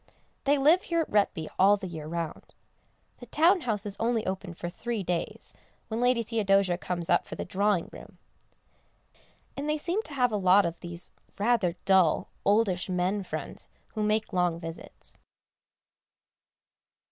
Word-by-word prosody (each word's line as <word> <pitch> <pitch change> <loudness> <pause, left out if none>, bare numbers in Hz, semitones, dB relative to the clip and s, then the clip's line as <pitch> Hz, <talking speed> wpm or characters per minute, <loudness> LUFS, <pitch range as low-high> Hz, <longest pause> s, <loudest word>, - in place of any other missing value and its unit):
They 285 +1 +4
live 310 +7 +5
here 335 -2 0
at - - -5
Retby 195 -6 +1
all 200 +2 +6
the 195 - -7
year 160 -4 -6
round. 165 0 -5 0.6
The 245 - -12
town 335 - +4
house 215 -6 0
is 200 -1 -2
only 230 -1 0
opened 190 -2 -4
for 175 - -5
three 220 +4 -4
days, 175 -1 -3 0.4
when 225 +1 -2
Lady 245 -1 +3
Theodosia 195 -5 +2
comes 175 -2 -3
up 175 - +2
for - - -6
the - - -5
Drawing 195 -1 +1
room. - - -12 1.4
And 285 +2 -3
they 305 - +1
seem 350 +7 -1
to 305 -9 -8
have 250 -3 +2
a 210 - 0
lot 190 0 +5
of 170 0 -3
these 175 0 -7 0.3
rather 205 -5 +2
dull, 190 -4 +3
oldish 200 -4 +2
men 185 +3 0
friends 190 - -5 0.2
who 215 - -5
make 215 0 0
long 175 -2 +1
visits. 165 -1 -9
200 Hz, 160 wpm, -28 LUFS, 180-235 Hz, 1.4 s, all